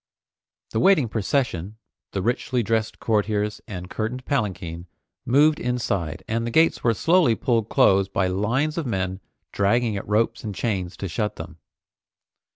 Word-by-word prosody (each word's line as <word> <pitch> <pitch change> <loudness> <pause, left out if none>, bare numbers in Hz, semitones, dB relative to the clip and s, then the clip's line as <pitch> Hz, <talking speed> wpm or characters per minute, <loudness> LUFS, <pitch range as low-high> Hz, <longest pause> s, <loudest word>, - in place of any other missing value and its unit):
The 110 - 0
waiting 155 -3 +4
procession, 110 - -1 0.3
the 95 - -2
richly 120 +1 0
dressed 110 0 -1
courtiers 105 -1 0
and 90 -5 -6
curtained 115 +6 -4
palanquin, 90 - -2 0.4
moved 150 +4 +4
inside 100 -10 -2
and 115 +1 -1
the 120 - -2
gates 160 +7 +3
were 115 -2 +3
slowly 165 - +3
pulled 115 -1 0
close 95 0 +4
by 95 - 0
lines 120 - 0
of 155 - -3
men 95 -3 -2 0.3
dragging 110 +2 +1
at - - -6
ropes 110 +2 +1
and 105 -3 -5
chains 95 -6 -2
to 100 - -4
shut 105 +5 -2
them. - - -9
110 Hz, 150 wpm, -24 LUFS, 95-125 Hz, 0.4 s, waiting